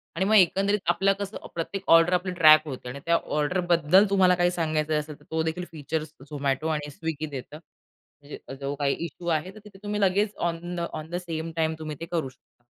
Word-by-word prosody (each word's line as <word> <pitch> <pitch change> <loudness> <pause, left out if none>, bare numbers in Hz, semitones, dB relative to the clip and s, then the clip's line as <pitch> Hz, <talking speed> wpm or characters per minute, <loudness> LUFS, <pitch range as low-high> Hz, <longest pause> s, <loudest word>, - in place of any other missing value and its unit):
आणि 185 +3 0
मग 215 +2 +3
एकंदरीत 195 +2 +4
आपलं 195 +3 +3
कसं 200 +1 -5 0.2
प्रत्येक 185 +4 -4
ऑर्डर 165 +2 +6
आपली 180 +1 0
ट्रॅक 155 -2 +7
होते 130 -3 -6
आणि 140 +3 -7
त्या 170 - +3 0.2
ऑर्डरबद्दल 175 +3 +3
तुम्हाला 185 -2 +4
काही 175 0 +2
सांगायचं 155 -3 0
असेल 150 -1 -8
तर - - -20
तो 160 0 0
देखील 165 +3 -3
फीचर्स 155 0 -4 0.2
Zomato 140 +2 -1
आणि 150 -1 -3
Swiggy 155 -1 -4
देतं. 140 +3 -7
म्हणजे 145 -2 -16 0.2
जो 140 +1 -2
काही 140 -1 0
इश्शू 170 +2 -9
आहे 165 +2 0
तर 215 - -11
तिथे 200 -2 -14
तुम्ही 210 0 -2
लगेच 200 +2 +2
on 175 +1 -6
the - - -3
on 155 +1 -6
the 175 - -4
same 165 -2 -4
time 160 -1 +1
तुम्ही 155 -1 -5
ते 165 - -5
करू 160 -6 -1
शकता. 130 -1 -28
165 Hz, 205 wpm, -26 LUFS, 155-180 Hz, 0.2 s, ट्रॅक